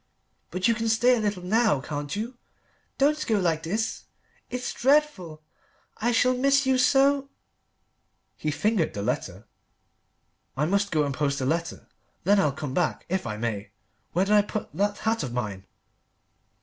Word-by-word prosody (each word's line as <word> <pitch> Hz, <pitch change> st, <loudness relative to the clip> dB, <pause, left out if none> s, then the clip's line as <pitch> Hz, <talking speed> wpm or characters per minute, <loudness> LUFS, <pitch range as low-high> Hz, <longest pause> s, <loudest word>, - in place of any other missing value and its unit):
"But 185 Hz, +1 st, 0 dB
you 230 Hz, -, +4 dB
can 225 Hz, 0 st, -2 dB
stay 240 Hz, +3 st, +4 dB
a -, -, -1 dB
little 205 Hz, -4 st, -2 dB
now, 215 Hz, -, +2 dB
can't 145 Hz, +4 st, -5 dB
you? 230 Hz, +5 st, -4 dB, 0.6 s
Don't 300 Hz, +2 st, +2 dB
go 220 Hz, -3 st, +2 dB
like 165 Hz, -4 st, +1 dB
this. 210 Hz, +7 st, -3 dB, 0.4 s
It's 250 Hz, 0 st, -4 dB
dreadful. 245 Hz, -, +1 dB, 0.5 s
I 235 Hz, +3 st, 0 dB
shall 250 Hz, +2 st, +3 dB
miss 275 Hz, +2 st, +3 dB
you 260 Hz, -1 st, +2 dB
so 275 Hz, +1 st, +3 dB, 0.5 s
" -, -, -48 dB
He 155 Hz, -, +1 dB
fingered 185 Hz, +3 st, 0 dB
the 100 Hz, -, -3 dB
letter. -, -, -3 dB, 1.1 s
"I 150 Hz, -, +2 dB
must 200 Hz, +4 st, +1 dB
go 155 Hz, -2 st, +2 dB
and 140 Hz, -1 st, -2 dB
post 140 Hz, 0 st, -1 dB
a 130 Hz, -, -1 dB
letter; 165 Hz, +4 st, -2 dB, 0.4 s
then 200 Hz, +3 st, +4 dB
I'll 150 Hz, -7 st, +3 dB
come 135 Hz, 0 st, -6 dB
back, 175 Hz, +2 st, -1 dB
if 185 Hz, -7 st, -1 dB
I 105 Hz, -1 st, -4 dB
may. 110 Hz, -3 st, -3 dB, 0.4 s
Where 185 Hz, +3 st, +2 dB
did 205 Hz, -, +1 dB
I 210 Hz, -, +7 dB
put 210 Hz, -5 st, -5 dB
that 205 Hz, +5 st, 0 dB
hat 225 Hz, 0 st, 0 dB
of 125 Hz, -3 st, -4 dB
mine?" 100 Hz, -6 st, -4 dB
200 Hz, 170 wpm, -26 LUFS, 150-235 Hz, 1.1 s, I